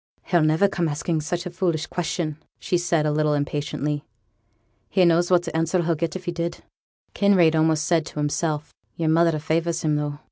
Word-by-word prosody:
'He'll 175 -2 +2
niver 155 +6 +3
come 175 -4 -1
asking 155 +2 -1
such 170 +3 -3
a 180 - -5
foolish 170 -3 -1
question,' 160 -3 -3 0.2
said 180 - 0
she, 170 -3 +1
a - - +1
little 150 0 +1
impatiently; 145 0 -2 0.9
'he 185 -2 +3
knows 170 +1 +3
what 175 -2 +3
answer 165 +2 +1
he'd 165 -1 0
get 165 0 -2
if 185 -1 -6
he 175 - -1
did.' 170 0 -4 0.5
Kinraid 185 -5 +4
said, - - +1
almost 160 0 +1
as 170 - +5
if - - -7
to - - -10
himself, 150 0 -2 0.2
'Yo'r 160 -1 -1
mother 165 0 +3
favours 165 +2 -1
him 150 -1 +1
though.' 145 -1 -3
165 Hz, 200 wpm, -23 LUFS, 155-175 Hz, 0.9 s, as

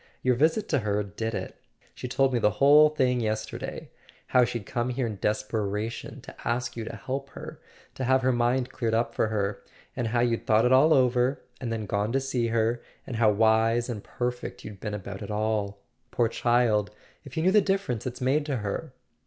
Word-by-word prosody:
Your 130 - +4
visit 160 - +2
to - - +2
her 105 -1 0
did 110 +3 -4
it. - - -6 0.3
She - - -6
told 135 +1 +1
me 120 - +2
the 105 - +4
whole 150 +3 +7
thing 125 -5 +1
yesterday. 110 -1 -4 0.3
How 125 - +4
she'd 120 -3 -3
come 120 +3 -2
here 125 0 -1
in 105 -4 -5
desperation, 105 +1 -2
to - - -11
ask 120 +1 -2
you 115 - -4
to 110 - -6
help 135 +5 -5
her, - - -9 0.3
to 130 - -4
have 130 +1 +3
her 130 - +3
mind 120 +1 +1
cleared 115 -3 -1
up 115 +1 0
for - - +1
her; 100 -2 -2 0.3
and 120 -2 -1
how 120 +1 +1
you'd 120 -1 0
thought 110 +2 +4
it 125 - +3
all 140 +5 +6
over, 125 0 +2 0.2
and 120 -3 -3
then 110 -2 -3
gone 100 +2 -1
to 135 - +3
see 130 -3 -1
her, 115 +1 0 0.2
and 120 - -5
how 110 -2 +4
wise 110 +3 +3
and 110 -4 -5
perfect 125 0 -4
you'd 100 -2 -9
been 105 0 -4
about 100 -1 -7
it 100 - -6
all. 105 -1 -1 0.3
Poor 120 0 +1
child— 115 -3 +2 0.3
if 135 0 -11
you 160 - +1
knew 185 - +4
the 210 +1 +6
difference 195 - -1
it's 125 0 -6
made 135 +4 +2
to 140 - -1
her!" 105 -3 -4
120 Hz, 210 wpm, -27 LUFS, 110-130 Hz, 0.3 s, whole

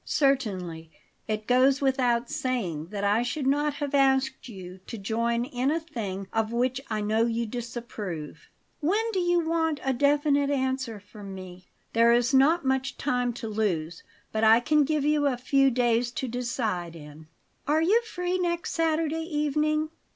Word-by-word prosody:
"Certainly. 190 - 0 0.4
It 215 -1 -2
goes 260 +3 +4
without 250 -3 +1
saying 190 - -2
that 200 +1 -5
I 205 +3 +3
should 265 +3 -2
not 290 +2 +1
have 290 -1 -4
asked 265 -2 +2
you 185 -3 -9
to 230 - -6
join 230 +3 -1
in 255 0 -1
a 320 +2 +1
thing 200 - -5
of 225 0 0
which 250 +2 0
I 215 -1 -1
know 220 +2 +1
you 230 0 -1
disapprove." 225 -8 -6 0.3
"When 420 +9 0
do 380 - +1
you 350 -2 +1
want 320 -2 0
a 270 - +1
definite 285 +1 +2
answer 260 -5 -1
from 205 -1 -10
me?" 185 -1 -10 0.3
"There 230 +1 +5
is 245 +2 +2
not 285 +4 +4
much 265 0 0
time 250 -4 0
to 230 -1 -6
lose; 180 -7 -2 0.3
but 220 0 -1
I 220 +1 +7
can 300 +3 +3
give 300 -1 0
you 300 -1 +2
a 260 -3 0
few 275 +2 +3
days 240 -1 +1
to 260 - -3
decide 225 -8 -3
in." 150 0 -12 0.4
"Are 310 +2 +3
you 425 +8 +4
free 365 -5 -3
next 345 -1 -1
Saturday 325 -1 0
evening?" 305 0 0
250 Hz, 165 wpm, -27 LUFS, 220-290 Hz, 0.4 s, I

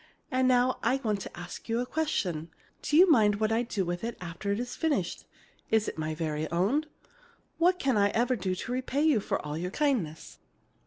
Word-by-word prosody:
And 255 0 +2
now 255 0 +3
I 235 +3 +2
want 210 -3 0
to - - -8
ask 175 +5 -9
you 230 +1 +1
a 250 - -1
question. 185 - -2 0.3
Do 295 - +1
you 370 +3 +8
mind 210 -7 +5
what 215 +1 0
I 225 +1 +2
do 215 -5 -2
with 175 +2 -3
it 235 0 -3
after 180 +3 -4
it 200 - 0
is 245 +1 -4
finished? 285 - -1 0.4
Is 220 -1 +2
it - - -3
my 155 0 -2
very 155 -1 -2
own? 210 - +1 0.7
What 355 +2 +4
can 270 -9 +1
I 200 0 +4
ever 240 +4 +1
do 185 -3 -2
to 210 - -5
repay 260 +3 -1
you 305 -8 +4
for - - -2
all 150 0 -4
your 180 +1 -2
kindness! 215 - -1
225 Hz, 210 wpm, -29 LUFS, 180-255 Hz, 0.7 s, you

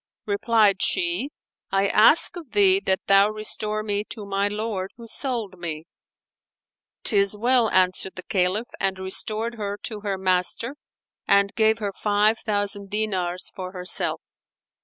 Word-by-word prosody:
Replied 210 -1 +2
she, 175 +10 +1 0.4
"I 195 +1 +1
ask 220 - +4
of 320 -10 -10
thee 195 -2 +5
that 190 0 +1
thou 195 +1 +5
restore 215 0 -3
me 205 -1 -1
to 215 -2 -9
my 200 0 0
lord 205 -2 -3
who 235 - -11
sold 230 -6 -2
me." 160 -2 -5 1.2
"'Tis 200 -1 +4
well," 240 0 +2
answered 185 0 +1
the 185 - -7
Caliph 190 +5 -1
and 195 -1 -1
restored 215 +4 -1
her 205 -1 -3
to 220 -1 -5
her 200 -2 -3
master 190 +7 0 0.5
and 200 0 +3
gave 220 0 +2
her 205 -3 -4
five 210 +2 +1
thousand 205 -1 -3
dinars 190 -4 -2
for 185 -1 -7
herself. 180 -1 +1
205 Hz, 140 wpm, -23 LUFS, 190-215 Hz, 1.2 s, thee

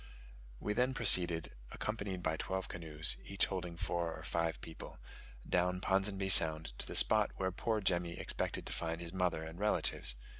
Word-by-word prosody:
We 105 - -3
then 125 +4 0
proceeded 90 -8 +3 0.2
(accompanied 100 -4 -5
by 80 - -1
twelve 95 +3 -4
canoes, 80 -7 -3
each 100 -1 +1
holding 90 -3 -6
four 85 -1 -3
or 80 - -11
five 85 -1 -2
people) 80 - -11 0.5
down 90 +1 0
Ponsonby 95 +1 -1
Sound 80 -6 +8
to - - -5
the - - -7
spot 110 -1 +5
where 95 -1 -2
poor 110 +3 -2
Jemmy 85 -3 -1
expected - - -3
to - - -4
find 80 0 -3
his 85 0 -8
mother 90 -4 -1
and 80 +2 -9
relatives. 105 -11 -1
90 Hz, 165 wpm, -34 LUFS, 80-95 Hz, 0.5 s, Sound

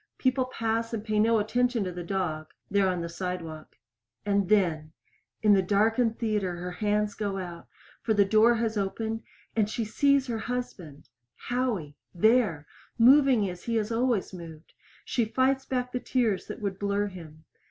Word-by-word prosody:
People 255 0 +1
pass 230 -2 -2
and 210 - -5
pay 215 -1 0
no 225 +1 +4
attention 240 +2 +1
to 185 - -3
the 175 0 -6
dog 165 -4 -3 0.2
there 200 -1 +3
on 180 -2 -1
the 170 - -3
sidewalk. 170 -3 -6 0.5
And 200 -2 +1
then 165 -7 +1 0.5
in 210 -1 +6
the 195 - +5
darkened 220 +4 +2
theater 210 -6 -1
her 180 +1 -5
hands 210 +2 0
go 200 -2 -3
out, 175 -3 -7 0.3
for 220 - 0
the 200 -1 +5
door 220 +4 +5
has 225 -1 -1
opened 220 +3 -3 0.3
and 215 -2 +2
she 225 +1 -2
sees 280 +5 +2
her 235 -4 -3
husband! 200 - -6 0.3
Howie. 235 - -2 0.2
There. 210 -6 +3 0.3
Moving 255 -3 +5
as 180 -1 -8
he 230 -1 +1
always 225 -1 0
moved! 165 -3 -11 0.3
She 240 - 0
fights 265 +4 +1
back 250 -1 -2
the 250 - -2
tears 235 -7 0
that - - -7
would 195 -2 -3
blur 200 0 0
him. 165 -5 -10
210 Hz, 165 wpm, -27 LUFS, 180-230 Hz, 0.5 s, in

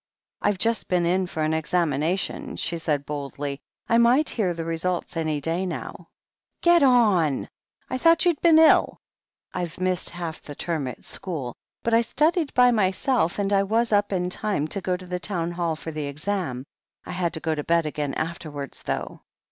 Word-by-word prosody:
"I've 205 - +1
just 230 +4 0
been 180 -2 +1
in 185 +2 +1
for 160 -2 -3
an 155 +1 +1
examination," 160 +1 -1
she 170 - -2
said 145 -3 -1
boldly. 140 -1 -5 0.3
"I 230 - +4
might 250 +6 +4
hear 200 -6 0
the 165 -1 -4
result 170 +2 -2
any 155 -2 -1
day 165 +5 -1
now," 185 - -6 0.6
"Get 345 -1 +6
on! 210 - +3 0.4
I 255 - -3
thought 330 +5 +4
you'd 340 -4 +2
been 330 -2 +6
ill," 320 0 +5 0.6
"I've 175 -2 -4
missed 185 -1 -1
half 170 -2 -6
the 145 - -9
term 160 -5 -2
at 125 - -8
school, 145 -10 -5 0.3
but 230 - 0
I 230 - +6
studied 310 - +1
by 250 0 +6
myself, 200 -1 +1
and 200 0 0
I 195 - +4
was 225 +4 +1
up 205 0 +2
in 180 -1 -1
time 195 -7 0
to 195 - -3
go 180 0 -1
to 185 - -11
the 180 0 -3
Town 175 -2 -2
Hall 170 -2 -1
for 160 +1 -7
the 150 -2 -4
exam. 150 -3 -3 0.4
I - - -6
had 180 -2 -1
to - - -3
go 160 0 -1
to 150 -1 -3
bed 170 0 +2
again 150 -2 -3
after 165 0 -4
wards, 145 -2 -6
though." - - -4
175 Hz, 190 wpm, -25 LUFS, 155-210 Hz, 0.6 s, Get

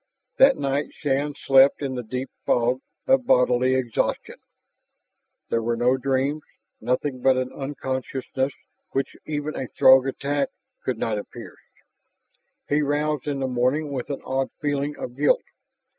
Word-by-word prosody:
That 270 0 +6
night 140 +1 -1
Shann 145 0 -1
slept 135 +1 +5
in 135 -2 -2
the 125 - -3
deep 125 +3 -5
fog 125 +2 +1 0.2
of 265 -2 +3
bodily 125 +1 +4
exhaustion. 125 -3 -1 1.1
There 115 - +1
were 115 +1 0
no 125 +2 +3
dreams, 135 +3 0 0.4
nothing 125 +2 -1
but 130 0 +4
an 130 0 -2
unconsciousness 130 -1 -3 0.4
which 135 - -1
even 150 0 -3
a 130 - -4
Throg 130 +2 +6
attack 140 +1 -1 0.3
could 130 -3 -2
not 110 -1 -1
have 105 - -6
pierced. - - -13 0.8
He 145 +1 +2
roused 150 0 -1
in 140 -2 -2
the 130 - 0
morning 130 +4 0
with 130 -3 -4
an 140 - -4
odd 135 0 -1
feeling 145 0 -1
of 120 - -6
guilt. 145 +2 +3
135 Hz, 145 wpm, -24 LUFS, 125-145 Hz, 1.1 s, That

